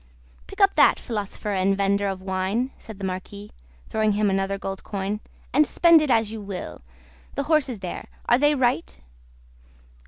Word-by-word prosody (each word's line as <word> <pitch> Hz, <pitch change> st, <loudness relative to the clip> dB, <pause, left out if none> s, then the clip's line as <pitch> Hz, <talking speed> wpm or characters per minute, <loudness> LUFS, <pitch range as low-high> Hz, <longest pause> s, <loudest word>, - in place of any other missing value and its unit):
"Pick 395 Hz, -, -11 dB
up 395 Hz, 0 st, +6 dB
that, -, -, +5 dB
philosopher 210 Hz, -2 st, -4 dB
and 195 Hz, +1 st, +1 dB
vendor 200 Hz, 0 st, +1 dB
of 190 Hz, -1 st, -4 dB
wine," 190 Hz, +7 st, -1 dB
said 220 Hz, -3 st, -10 dB
the 195 Hz, -, -5 dB
Marquis, 195 Hz, +2 st, -6 dB, 0.4 s
throwing 215 Hz, -1 st, +1 dB
him 205 Hz, -1 st, +1 dB
another 195 Hz, +1 st, 0 dB
gold 195 Hz, -1 st, -6 dB
coin, 200 Hz, +1 st, -3 dB, 0.3 s
"and 300 Hz, +3 st, +4 dB
spend 335 Hz, -2 st, +6 dB
it 305 Hz, -, -1 dB
as 225 Hz, -3 st, +2 dB
you 220 Hz, -1 st, -6 dB
will. 195 Hz, -2 st, -7 dB, 0.5 s
The 280 Hz, -, -1 dB
horses 290 Hz, -5 st, +1 dB
there; 180 Hz, -, -6 dB, 0.2 s
are 240 Hz, -, +4 dB
they 295 Hz, +1 st, +4 dB
right?" 240 Hz, -, 0 dB
205 Hz, 165 wpm, -24 LUFS, 195-250 Hz, 0.5 s, up